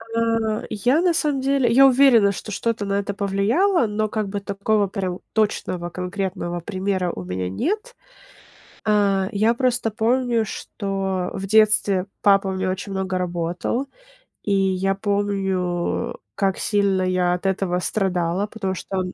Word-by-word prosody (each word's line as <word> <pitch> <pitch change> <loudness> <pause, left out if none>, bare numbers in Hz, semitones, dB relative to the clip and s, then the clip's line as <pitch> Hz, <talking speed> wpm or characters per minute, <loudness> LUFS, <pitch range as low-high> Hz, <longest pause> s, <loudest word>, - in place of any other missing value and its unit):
А, 225 -1 0
я 245 - +2
на 355 -1 +3
самом 295 -4 0
деле, 270 -3 +2
я 270 +3 +7
уверена, 245 -6 +5
что 210 - -7
что-то 225 +1 -2
на 200 - -2
это 200 0 -3
повлияло, 220 - +2
но 215 0 -1
как 215 -2 -2
бы 205 +1 -3
такого 200 +1 0
прям 185 -2 -3
точного 185 -5 -1
конкретного 180 -1 -3
примера 185 -1 -2
у 95 - -7
меня 90 0 -3
нет. 425 - -2 0.9
А, 200 -3 +2
я 215 +3 +2
просто 245 -2 0
помню, 235 +1 +1
что 195 -3 -3
в 195 - -4
детстве 210 -3 +3 0.2
папа 195 -1 +4
у - - -1
меня 190 0 -1
очень 190 +2 -5
много 190 -1 -2
работал. 175 +7 -2 0.6
И 205 - 0
я 195 0 +1
помню, 195 -3 -1 0.2
как 195 -2 0
сильно 200 -3 +1
я 185 -1 +1
от 180 +2 -4
этого 190 -2 0
страдала, 185 -1 -1
потому 200 -3 -3
что 190 +2 -5
он 185 0 -3
200 Hz, 150 wpm, -22 LUFS, 185-220 Hz, 0.9 s, я